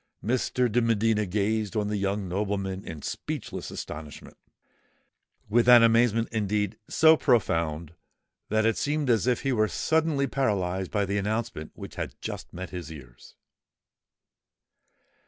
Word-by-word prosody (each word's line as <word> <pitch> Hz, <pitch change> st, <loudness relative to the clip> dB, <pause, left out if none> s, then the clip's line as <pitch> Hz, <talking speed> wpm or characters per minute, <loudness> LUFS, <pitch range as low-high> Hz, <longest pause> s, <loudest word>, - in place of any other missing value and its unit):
Mr. 125 Hz, +1 st, +1 dB
de 120 Hz, +3 st, +2 dB
Medina 115 Hz, -2 st, +1 dB
gazed 105 Hz, +2 st, -1 dB
on 105 Hz, -1 st, 0 dB
the 105 Hz, -, -2 dB
young 100 Hz, 0 st, -1 dB
nobleman 95 Hz, 0 st, -2 dB
in 80 Hz, -4 st, -8 dB
speechless -, -, -5 dB
astonishment,—with 100 Hz, +8 st, -6 dB
an 120 Hz, -1 st, +9 dB
amazement, 115 Hz, 0 st, +3 dB
indeed, 105 Hz, -2 st, -1 dB
so 160 Hz, 0 st, +6 dB
profound, 85 Hz, -, 0 dB, 0.6 s
that 110 Hz, +1 st, +2 dB
it 115 Hz, -, +2 dB
seemed 145 Hz, -2 st, 0 dB
as 115 Hz, 0 st, +2 dB
if 125 Hz, -2 st, +1 dB
he 135 Hz, -, 0 dB
were 110 Hz, -2 st, +2 dB
suddenly 160 Hz, +2 st, +1 dB
paralysed 95 Hz, -9 st, -1 dB
by 100 Hz, -2 st, 0 dB
the 100 Hz, +1 st, -1 dB
announcement 110 Hz, -5 st, -3 dB
which -, -, -10 dB
had -, -, -4 dB
just -, -, -6 dB
met 90 Hz, 0 st, -7 dB
his 90 Hz, -4 st, -6 dB
ears. 65 Hz, -5 st, -13 dB
105 Hz, 135 wpm, -27 LUFS, 95-120 Hz, 0.6 s, an